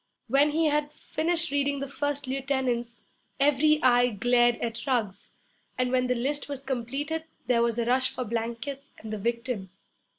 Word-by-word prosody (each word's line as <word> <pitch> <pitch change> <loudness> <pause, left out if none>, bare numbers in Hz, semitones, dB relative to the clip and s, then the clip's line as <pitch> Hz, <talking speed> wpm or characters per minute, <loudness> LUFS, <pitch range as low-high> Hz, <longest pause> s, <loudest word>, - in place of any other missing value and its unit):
When 275 +5 +4
he 320 +2 +1
had 295 -1 +1
finished 335 +2 -1
reading 285 0 +1
the 275 - -3
first 290 +1 -2
lieutenants 260 -3 -1 0.4
every 295 +2 +4
eye 245 -1 +5
glared 240 +2 +3
at 230 +2 -4
Ruggs; 215 -7 -1 0.4
and 255 0 +1
when 255 -1 +2
the 250 - +1
list 280 +4 -2
was 280 -2 -4
completed 275 +5 -3 0.2
there 240 -1 +3
was 235 -1 +1
a 235 - +1
rush 255 +2 +2
for 255 - -4
blankets 235 +5 -4
and 220 0 -7
the 215 - -3
victim. 235 -2 -2
255 Hz, 165 wpm, -27 LUFS, 235-285 Hz, 0.4 s, eye